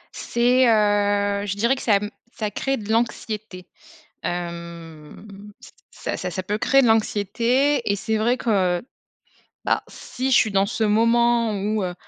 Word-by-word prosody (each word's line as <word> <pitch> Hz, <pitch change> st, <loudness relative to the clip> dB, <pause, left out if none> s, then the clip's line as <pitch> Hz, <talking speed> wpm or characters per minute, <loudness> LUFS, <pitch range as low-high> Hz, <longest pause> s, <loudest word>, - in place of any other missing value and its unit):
C'est 245 Hz, +2 st, +2 dB
heu, 205 Hz, -2 st, +2 dB
je 200 Hz, -1 st, -3 dB
dirais 235 Hz, +5 st, +2 dB
que 270 Hz, -, -8 dB
ça 215 Hz, -, +3 dB
m 210 Hz, +1 st, -5 dB, 0.2 s
ça 215 Hz, -2 st, -3 dB
crée 270 Hz, +6 st, -2 dB
de 215 Hz, 0 st, -6 dB
l'anxiété, 215 Hz, -4 st, -3 dB, 0.6 s
hem, 170 Hz, 0 st, -7 dB, 0.3 s
c -, -, -13 dB, 0.2 s
ça -, -, -5 dB
ça 180 Hz, -, -4 dB
ça 185 Hz, -, -3 dB
peut 205 Hz, +3 st, -2 dB
créer 275 Hz, +5 st, +3 dB
de 245 Hz, -, +3 dB
l'anxiété 230 Hz, +6 st, +1 dB
et -, -, +1 dB
c'est 220 Hz, +2 st, -2 dB
vrai 235 Hz, +3 st, +2 dB
que, 185 Hz, -6 st, 0 dB, 0.8 s
bah, -, -, +1 dB
si 260 Hz, +1 st, -5 dB
je 250 Hz, -, +5 dB
suis 215 Hz, -, +3 dB
dans 195 Hz, -1 st, +2 dB
ce 205 Hz, -, -3 dB
moment 230 Hz, +1 st, +2 dB
où, 210 Hz, +1 st, -1 dB
heu, 180 Hz, -, -4 dB
215 Hz, 165 wpm, -22 LUFS, 200-235 Hz, 0.8 s, je